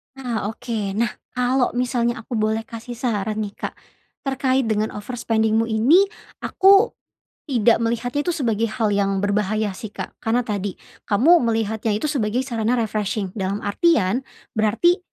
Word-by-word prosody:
Nah. 240 -6 -3
Oke. 220 -3 -3
Nah, 235 +1 +1 0.2
kalau 250 0 +1
misalnya 240 -1 0
aku 235 -1 -3
boleh 220 +1 0
kasih 230 +2 -8
saran 215 -3 -1
nih, 205 - -5
Kak, - - -4 0.5
terkait 265 -1 +1
dengan 215 -1 0
overspending-mu 220 0 0
ini, 260 - +4 0.3
aku 395 +4 +4 0.5
tidak 235 -5 +3
melihatnya 240 +5 -1
itu 350 - +1
sebagai 230 -7 0
hal 220 -1 -1
yang 195 -1 +1
berbahaya 210 +1 0
sih, 195 +3 -7
Kak. - - -7
Karena 235 +2 +1
tadi, 205 -4 -3 0.3
kamu 270 +12 +5
melihatnya 220 -1 0
itu 255 +8 -1
sebagai 240 -3 0
sarana 235 -2 0
refreshing 210 -4 -1
dalam 195 +2 -2
artian 240 - +2 0.2
berarti 230 - +2
225 Hz, 145 wpm, -22 LUFS, 210-250 Hz, 0.5 s, kamu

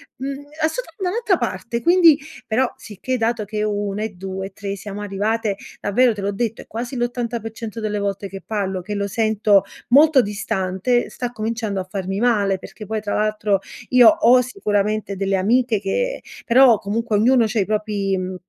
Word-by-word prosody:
mhmm, 275 +2 -5 0.2
assotu 470 +11 -2
da 360 - +1
un'altra 425 -3 +1
parte. 235 +2 -3
Quindi 340 -3 +6 0.3
però, 245 +3 +1
sicché 230 +4 -4
dato 225 -1 0
che 210 +1 -3
1 205 0 -2
e 220 - -2
2 190 0 -6
e 195 - -16
3 200 -1 -5
siamo 205 +1 -7
arrivate, 205 +1 -1 0.2
davvero, 235 +4 +3
te 205 - -7
l'ho 200 +1 -1
detto, 225 +2 -3
è - - -15
quasi 240 +4 -5
l'80% 235 -2 -4
delle 210 -1 -2
volte 200 -1 -3
che 195 0 -8
parlo, 195 -3 -2
che 205 +4 -6
lo 200 0 -1
sento 215 -1 +3 0.3
molto 285 +2 +6
distante, 200 +2 -1
sta 245 -1 -5
cominciando 220 -3 -2
a - - -4
farmi 195 0 -3
male 205 -5 +2
perché 215 - -10
poi, 215 +1 -3
tra 205 - -3
l'altro, 210 -2 +1 0.3
io 250 -2 +7
ho 310 -6 +6
sicuramente 210 - -1
delle 195 0 0
amiche 220 +2 +2
che - - -1 0.2
però, 250 -1 +6
comunque, 215 +1 -1
ognuno 240 +3 +4
c'ha 220 +1 -1
i 195 - +2
propri 210 -2 -1
mhmm, 185 0 -4
215 Hz, 180 wpm, -21 LUFS, 200-240 Hz, 0.3 s, io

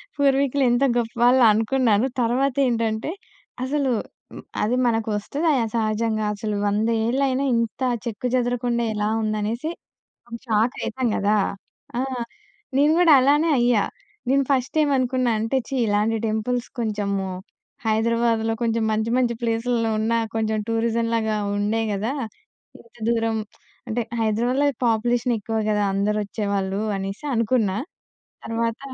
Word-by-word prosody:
పూర్వీకులు 280 -1 +2
ఎంత 240 +3 +2
గొప్పవాళ్ళా 240 +2 +3
అనుకున్నాను. 225 0 +2 0.2
తరువాత 250 +3 +1
ఏంటంటే 230 +2 -1 0.5
అసలు 275 0 0 0.4
హ్మ్ - - -9 0.2
అది 225 +4 +1
మనకొస్తది 225 +6 -1
ఆయా 255 -6 +2
సహజంగా 215 0 0
అసలు 210 0 -3
100 210 +2 +1 0.2
ఏళ్ళయినా 265 +2 +1
ఇంత 230 -1 -1 0.3
చెక్కు 235 +1 -3
చెదరకుండా 245 -1 0
ఎలా 210 0 -1
ఉంది 215 0 -1
అనేసి 235 +9 -2 0.8
షాకైతాం 235 +3 0
కదా! 205 +2 +2 0.6
ఆ! - - +1 0.8
నేను 290 +3 +4
కూడా 340 -3 +6
అలానే 295 +5 +3
అయ్యా. 240 -4 +3 0.4
నేను 275 +1 +3
ఫస్ట్ 265 +1 0
ఏమనుకున్నానంటే 255 -4 +1
ఛీ, 270 - -3
ఇలాంటి 210 +2 +1
టెంపుల్స్ 235 +3 -1
కొంచెము 200 -3 -1 0.6
'హైదరాబాద్‌లో' 225 0 +1
కొంచెం 230 -1 +1
మంచి 220 +1 0
మంచి 245 -2 +1
ప్లేస్‌లో 230 0 0
ఉన్నా 230 +1 +1 0.2
కొంచెం 220 -1 0
టూరిజం 230 0 0
లాగా 220 -1 0 0.2
ఉండే 210 +2 0
కదా! 210 +5 -1 0.7
ఇంత 230 - -24
దూరం 225 -1 +1 0.5
అంటే, 235 +1 -1 0.2
హైదరాబాద్‌లో 240 +6 +1 0.2
పాపులేషన్ 240 +2 +1
ఎక్కువ 225 +2 -4
కదా! 210 -1 +1
అందరూ 205 +2 +1
ఓచ్చేవాళ్ళు 200 -2 -2 0.2
అనేసి 195 +6 -5
అనుకున్నా. 225 -4 +1 0.7
తరువాత 230 0 -2
230 Hz, 120 wpm, -23 LUFS, 215-250 Hz, 0.8 s, కూడా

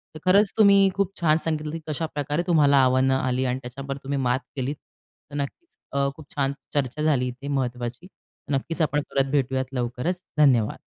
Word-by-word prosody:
तर - - -7
खरंच 200 +2 +5
तुम्ही 200 -2 +6
खूप 200 -1 0
छान 160 -2 +4
सांगितलं, 155 -2 -2
की 165 - -4
कशाप्रकारे 150 0 -2
तुम्हाला 145 -4 +4
आव्हानं 130 +1 +3
आली 130 0 0
आणि 125 +1 -1
त्याच्यावर 135 +2 -6
तुम्ही 140 +1 -2
मात 125 -1 +1 0.2
केलीत. 135 +2 -2 0.6
तर 145 - -7
नक्कीच 145 - -5 0.2
अ, 140 0 +1
खूप 155 - -12
छान 140 -1 +1 0.2
चर्चा 145 0 -1
झाली 140 -5 +2
इथे 125 +3 -7
महत्त्वाची. 125 +2 -3 0.4
नक्कीच 160 +5 -1
आपण 150 -1 +1
परत 135 0 +1
भेटूयात 130 -2 +1
लवकरच, 125 +9 -2 0.2
धन्यवाद. 125 -8 +4
140 Hz, 170 wpm, -25 LUFS, 130-155 Hz, 0.6 s, तुम्ही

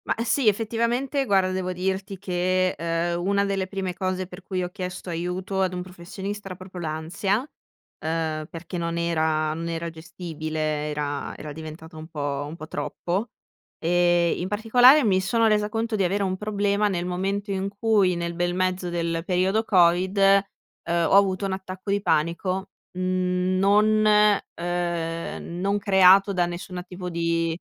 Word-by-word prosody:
Ma - - +1
sì. 245 +1 +1
Effettivamente 235 +6 +1
guarda, 190 -3 +2
devo 185 -1 -2
dirti 190 +2 -3
che, 185 0 +1
ehm, 170 +2 -1
una 200 +1 +2
delle 195 -1 -1
prime 190 -1 -3
cose 185 0 -2
per 180 +1 -11
cui 185 -1 -3
ho 180 - -3
chiesto 180 -1 -6
aiuto 180 +3 -2
ad 185 -1 +1
un 180 - -3
professionista, 190 +2 -7
proprio 185 0 -9
l'ansia, 165 +6 -1 0.6
uhm, 160 -1 -2
perché 170 +2 -6
non 170 0 -2
era 160 -2 +1
non 165 +1 -4
era 165 0 -3
gestibile, 155 -2 -4
era 145 -1 -3
era 150 - -7
diventata 160 +2 -9
un 155 0 -8
po' 145 -3 -3
un 155 - -7
po' 155 -2 -9
troppo. 190 +8 -3 0.5
E 175 0 +3
in 180 - -3
particolare 245 +7 +6
mi 190 -4 +3
sono 225 +4 +2
resa 210 -1 +2
conto 225 +1 -1
di 200 - +1
avere 195 +3 +1
un 185 -1 0
problema 205 0 0
nel 175 -3 -1
momento 195 +3 -2
in 195 0 -1
cui 200 -3 +2
nel 170 0 -3
bel 175 +1 -1
mezzo 185 -1 0
del 170 -1 -2
periodo 190 +4 +1
covid, 185 -1 +3
uhm, 195 -3 +1
ho - - +4
avuto 195 -1 +3
un 195 - -2
attacco 190 +1 -5
di 200 0 +1
panico, 185 +2 0 0.3
mhmm, 185 0 0
non 210 +2 +4 0.5
ehm, 170 -1 -3
non 200 +2 +1
creato 195 0 +5
da 175 -2 +1
nessuna 180 +1 -6
tipo 180 0 -8
di 165 -1 0
185 Hz, 160 wpm, -25 LUFS, 170-195 Hz, 0.6 s, particolare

